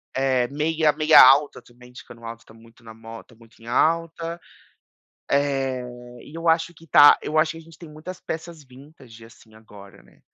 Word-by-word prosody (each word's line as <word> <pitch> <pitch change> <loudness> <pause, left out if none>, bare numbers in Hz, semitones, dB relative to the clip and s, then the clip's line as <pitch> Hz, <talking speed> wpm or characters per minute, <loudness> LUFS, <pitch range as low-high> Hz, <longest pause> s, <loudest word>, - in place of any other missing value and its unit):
É, 130 -2 0
meia 155 +2 0
meia 155 +1 +6
alta 140 +3 +4
também 125 +1 -19
de 125 - -13
cano 115 0 -15
alto 115 0 -10
tá 110 - -19
muito 115 +1 -21
na 110 -1 -13
mo 115 0 -12
tá 120 - -23
muito 115 0 -23
em 115 - -16
alta. 165 +5 -1 0.9
Eh, 135 -2 -1 0.4
e 150 - -16
eu 165 0 -3
acho 165 +1 0
que 165 +2 -19
tá 145 0 +6
eu 155 +1 -2
acho 155 0 +1
que 165 - -12
a - - -12
gente 165 -1 -18
tem 170 - -13
muitas 155 +4 -11
peças 160 -1 -8
vintage 130 -3 -17
assim, 110 -1 -20
agora, 105 -3 -17
né. - - -26
140 Hz, 195 wpm, -22 LUFS, 115-160 Hz, 0.9 s, meia